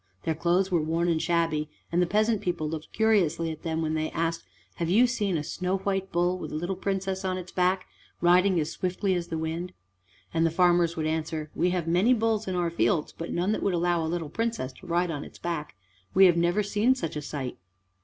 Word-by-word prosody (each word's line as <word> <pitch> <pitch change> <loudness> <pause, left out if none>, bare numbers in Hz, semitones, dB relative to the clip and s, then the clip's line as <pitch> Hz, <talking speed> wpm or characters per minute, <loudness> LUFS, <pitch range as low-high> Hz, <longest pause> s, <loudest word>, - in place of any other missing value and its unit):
Their 160 - 0
clothes 175 +4 +1
were 170 -3 +3
worn 165 +3 0
and 160 -2 +1
shabby, 165 -3 0 0.2
and 175 +1 +2
the 180 - +2
peasant 215 +2 +2
people 175 -5 -1
looked 155 0 -6
curiously 170 -7 +2
at 155 - -8
them 160 -1 -2
when 155 0 -1
they 155 0 -1
asked, 165 0 -2 0.3
"Have 170 -1 -1
you 220 +7 +6
seen 210 -8 0
a 150 - -2
snow 185 +5 -2
white 195 0 -2
bull 175 +1 +1
with - - -6
a - - -4
little 175 +5 -2
Princess 190 0 -2
on 185 -1 -1
its 180 0 -7
back, 185 +1 +1 0.3
riding 180 +1 +4
as 155 +1 -1
swiftly 185 +2 -1
as 175 -1 -2
the 165 - -3
wind?" 165 +3 -3 0.6
And 165 0 +2
the 165 - +4
farmers 175 0 +3
would 155 - -1
answer, 155 -1 -2
"We 180 - +1
have 175 -2 -1
many 185 +9 +4
bulls 220 -2 0
in 185 - -1
our 175 -1 0
fields, 150 +1 +1
but 165 - -6
none 180 +4 0
that 215 - -1
would 195 -3 +1
allow 170 -1 +1
a 160 - -2
little 165 -2 -3
Princess 225 - -2
to 185 - -13
ride 175 0 +1
on 145 -2 -4
its - - -12
back: 165 -8 -4 0.4
we 190 +1 +8
have 175 -2 +6
never 175 +5 +2
seen 210 +5 +2
such 165 -12 -4
a 150 - -3
sight." 140 -3 -5
175 Hz, 230 wpm, -27 LUFS, 160-190 Hz, 0.6 s, we